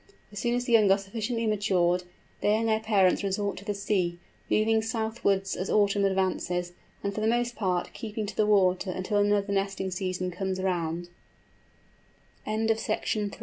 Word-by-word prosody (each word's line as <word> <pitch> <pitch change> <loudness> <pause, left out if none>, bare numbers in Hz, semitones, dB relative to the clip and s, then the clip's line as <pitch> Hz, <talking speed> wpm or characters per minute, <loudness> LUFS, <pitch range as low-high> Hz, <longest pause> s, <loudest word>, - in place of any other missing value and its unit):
As 205 - -6
soon 240 +2 0
as 245 0 -1
the 240 - 0
young 215 -3 +6
are 195 - +6
sufficiently 225 +4 -3
matured, 185 -4 +1 0.4
they 210 - +3
and 225 +1 0
their 220 -1 +2
parents 205 -4 +3
resort 200 +1 -1
to 200 - -10
the 205 -1 -2
sea, 185 -4 0 0.3
moving 220 +1 +3
southwards 220 -3 -1
as 185 - -3
autumn 200 -1 +3
advances, 180 -2 0 0.3
and 200 - -1
for 215 - -3
the 215 - +1
most 240 +1 +1
part 180 -4 -1
keeping 220 -1 -4
to 200 -1 -6
the 215 - +2
water 190 -2 +3
until 185 +3 -1
another 205 0 +2
nesting 195 -1 -1
season 185 0 -2
com 190 +1 -2
200 Hz, 155 wpm, -28 LUFS, 190-220 Hz, 0.4 s, young